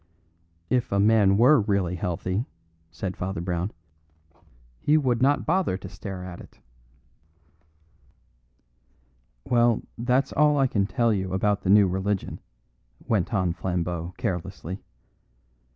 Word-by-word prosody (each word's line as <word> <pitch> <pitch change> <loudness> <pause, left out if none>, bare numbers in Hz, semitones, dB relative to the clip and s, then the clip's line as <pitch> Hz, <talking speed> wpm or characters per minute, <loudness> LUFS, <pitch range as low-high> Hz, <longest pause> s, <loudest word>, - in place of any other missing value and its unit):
"If 125 -2 +1
a 100 - +1
man 100 -2 +4
were 125 +3 +6
really 100 -4 0
healthy," 90 +5 -2 0.4
said 90 +4 -5
Father 95 0 -4
Brown, 90 +1 -2 1.1
"he 150 +1 +3
would 125 -5 +1
not 140 +2 +2
bother 175 - +1
to 95 - -9
stare 95 -1 -7
at 90 -1 -8
it." - - -16 2.9
"Well, 120 -1 +2 0.2
that's 125 +3 +1
all 150 0 +4
I 135 - +4
can 100 -6 0
tell 115 -1 +1
you 95 -2 -2
about 100 +1 +1
the 95 - -2
new 100 0 +6
religion," 95 +2 -2 0.7
went 100 -6 0
on 95 -6 +1
Flambeau 90 -1 -3
carelessly. 90 0 -4
100 Hz, 120 wpm, -25 LUFS, 90-120 Hz, 2.9 s, were